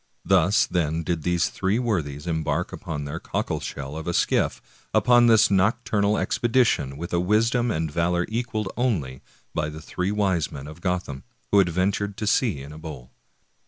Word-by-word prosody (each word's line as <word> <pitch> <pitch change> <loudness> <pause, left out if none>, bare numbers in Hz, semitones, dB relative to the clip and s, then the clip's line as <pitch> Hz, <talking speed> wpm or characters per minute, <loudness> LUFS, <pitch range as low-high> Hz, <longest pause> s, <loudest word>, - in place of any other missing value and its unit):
Thus, 95 +2 +4
then, 80 -2 -1
did 85 0 -1
these 85 +1 +1
three 100 +3 0
worthies 80 - -2
embark 80 -3 -1
in 75 -2 -5
their 75 +3 -5
cockleshell 70 -2 -4
of 80 +1 -6
a 85 - -1
skiff - - +1 0.4
upon 120 -1 +5
this 110 -2 +5
nocturnal 105 +1 +2
expedition, 115 - +1
with 85 +3 -6
a 85 - +2
wisdom 115 +6 +2
and 80 -6 -1
valor 85 +2 +1
equaled 110 -3 -3
only 80 - -1 0.3
by 75 -2 -1
the 75 0 -8
three 90 +4 -3
wise 95 -6 0
men 70 -1 -8
of 80 +3 -11
Gotham/ 90 -7 -2 0.3
who 100 - +6
adventured 95 +3 0
to 110 - -3
sea 105 - +1
in 70 +2 -10
a 80 - -10
bowl. 75 -6 -9
90 Hz, 165 wpm, -24 LUFS, 80-105 Hz, 0.4 s, who